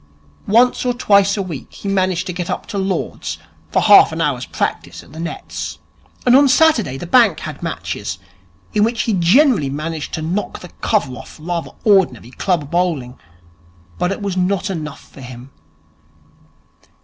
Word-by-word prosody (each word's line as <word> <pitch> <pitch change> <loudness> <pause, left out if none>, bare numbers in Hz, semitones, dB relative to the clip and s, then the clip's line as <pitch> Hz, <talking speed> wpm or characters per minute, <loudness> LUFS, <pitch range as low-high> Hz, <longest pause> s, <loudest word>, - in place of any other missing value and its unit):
Once 240 +4 +4
or 250 -1 0
twice 200 -4 +3
a 200 - -1
week 160 -8 -7
he - - -8
managed 185 -2 0
to 180 - -4
get 175 -1 -4
up - - -3
to - - -8
Lord's 190 0 -3 0.3
for - - +2
half 205 -5 +7
an 160 - -5
hour's 140 -6 -1
practice - - -3
at - - -18
the 160 - -9
nets; 170 +1 -5 0.5
and 250 0 +6
on 280 +1 +6
Saturdays 260 - +3
the - - -4
bank 235 +6 +4
had - - -7
matches, - - -4 0.6
in 210 - +3
which 230 +1 +1
he 225 - 0
generally 190 - +4
managed 155 +2 -4
to 160 - -4
knock 180 +6 -3
the 180 - -10
cover 195 - +1
off - - -11
rather 170 +1 -3
ordinary 170 - +2
club 155 -1 -1
bowling. 160 -8 -1 0.8
But 180 - +1
it 200 - -4
was 200 -2 -2
not 195 +2 0
enough 155 -5 -6
for 135 - -15
him. 125 +1 -10
180 Hz, 170 wpm, -18 LUFS, 155-205 Hz, 0.8 s, half